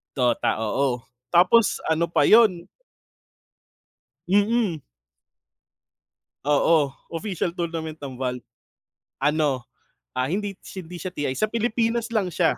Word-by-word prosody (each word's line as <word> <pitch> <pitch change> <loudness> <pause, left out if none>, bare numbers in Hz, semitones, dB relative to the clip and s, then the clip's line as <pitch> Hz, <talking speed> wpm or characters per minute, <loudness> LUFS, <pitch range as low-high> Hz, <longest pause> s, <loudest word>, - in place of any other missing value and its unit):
Dota, 120 -3 +1
oo, 125 +2 0 0.3
tapos 185 +6 +4
ano 160 +1 +2
pa 170 - +1
'yon. 200 -6 +5 1.6
Mm. 205 - +2 1.6
Oo, 145 0 +3 0.2
official 175 -2 -3
tournament 165 -2 -3
ng 130 -2 -7
Valve. 125 -2 -3 0.7
Ano, 145 -3 +1 0.5
ah, 130 - +1
hindi 195 +6 -3 0.2
hindi 180 -2 -8
siya 180 +2 -6
TI 140 -4 -2
sa 215 - +2
Pilipinas 230 +1 0
lang 200 -6 -1
siya, - - +2
170 Hz, 105 wpm, -24 LUFS, 140-205 Hz, 1.6 s, yon